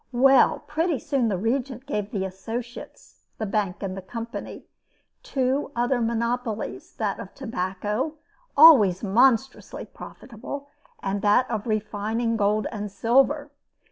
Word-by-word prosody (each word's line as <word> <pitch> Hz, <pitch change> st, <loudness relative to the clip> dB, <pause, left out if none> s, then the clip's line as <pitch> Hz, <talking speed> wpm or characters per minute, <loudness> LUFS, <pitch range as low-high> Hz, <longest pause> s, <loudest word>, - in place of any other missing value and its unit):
Well, 265 Hz, +2 st, +5 dB
pretty 320 Hz, 0 st, 0 dB
soon 270 Hz, -1 st, 0 dB
the 200 Hz, -4 st, 0 dB
Regent 250 Hz, +4 st, -2 dB
gave 210 Hz, -7 st, -3 dB
the 195 Hz, -4 st, -2 dB
associates 225 Hz, +6 st, -8 dB, 0.2 s
the 220 Hz, -, -3 dB
bank 200 Hz, -2 st, -2 dB
and 190 Hz, -1 st, -3 dB
the 195 Hz, -, -6 dB
company 230 Hz, +5 st, -7 dB, 0.6 s
two 265 Hz, +1 st, -1 dB
other 245 Hz, +1 st, +1 dB
monopolies: 235 Hz, 0 st, -2 dB
that -, -, -2 dB
of -, -, -9 dB
tobacco, 210 Hz, -, -3 dB, 0.4 s
always 230 Hz, -, +8 dB
monstrously 245 Hz, +5 st, +2 dB
profitable, 280 Hz, +5 st, -9 dB, 0.3 s
and 195 Hz, +1 st, -2 dB
that 210 Hz, +5 st, +3 dB
of 220 Hz, 0 st, -3 dB
refining 220 Hz, +2 st, -1 dB
gold 210 Hz, 0 st, +1 dB
and 210 Hz, -3 st, -5 dB
silver. 270 Hz, +7 st, +2 dB
230 Hz, 125 wpm, -25 LUFS, 205-260 Hz, 0.6 s, always